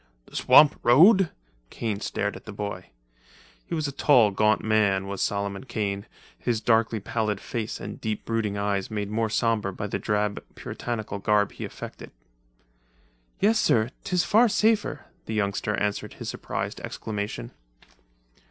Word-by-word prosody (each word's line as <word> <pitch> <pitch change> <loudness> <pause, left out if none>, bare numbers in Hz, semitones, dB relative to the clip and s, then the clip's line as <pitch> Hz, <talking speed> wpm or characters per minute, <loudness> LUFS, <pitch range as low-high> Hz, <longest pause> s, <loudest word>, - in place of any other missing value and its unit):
"The - - -16
swamp 150 -1 +6
road!" 180 - +6 0.4
Kane 110 -3 -3
stared 105 -1 -2
at - - -11
the 110 - -7
boy. 100 -2 -5 0.8
He 170 - -2
was 155 -2 -1
a - - -3
tall, 125 -6 +4
gaunt 105 +2 +2
man, 100 -3 +1
Solomon 100 +2 -2
Kane, 100 -4 -3 0.3
his 120 -2 0
darkly 115 0 +2
pallid 105 0 -2
face 115 -2 -4
and 100 +1 -7
deep 110 -1 -3
brooding 110 -3 -1
eyes 100 -1 -1
made 105 -2 -3
more 110 +1 0
sombre 110 -3 +1
by 100 +2 -5
the 105 - -3
drab 105 -1 -1
Puritanical 110 -4 -5
garb 105 0 +2
he - - -6
affected. - - -9 1.3
"Yes, 215 +2 +3
sir, 115 +2 +2
'tis 180 -3 +1
far 230 +3 +4
safer," 215 - +1 0.2
the 110 - -3
youngster 105 0 0
answered 105 0 -2
to - - -18
his - - -5
surprised - - -4
exclamation. 105 +2 -5
110 Hz, 150 wpm, -26 LUFS, 100-120 Hz, 1.3 s, swamp